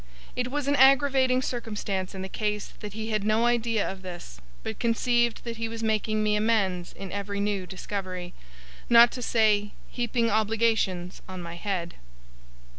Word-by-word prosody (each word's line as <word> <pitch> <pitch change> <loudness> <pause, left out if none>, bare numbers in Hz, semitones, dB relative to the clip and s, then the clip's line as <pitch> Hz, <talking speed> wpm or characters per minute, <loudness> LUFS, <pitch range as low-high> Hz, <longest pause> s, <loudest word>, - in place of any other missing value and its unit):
It 250 0 -1
was 285 +1 -2
an 285 - +3
aggravating 265 -1 +5
circumstance 205 -6 -3
in 190 - -5
the - - -4
case 210 +1 -3
that 210 -2 -7
he 220 +1 -4
had 215 -2 0
no 215 +2 +2
idea 230 -2 +1
of 190 0 -6
this, 175 - -9 0.2
but 110 - -5
conceived 240 0 +1
that 235 -1 -5
he 225 0 -2
was 230 0 -6
making 215 0 +1
me 210 0 +2
amends 205 -5 +1
in 195 -1 -8
every 200 0 -3
new 200 -2 -1
discovery: 185 -2 -5 0.6
not 235 0 +8
to 250 - -6
say, 210 -3 +2 0.2
heaping 240 -1 0
obligations 215 -4 +1
on 185 -1 -6
my 170 0 -7
head. 175 -2 -3
215 Hz, 165 wpm, -27 LUFS, 195-235 Hz, 0.6 s, not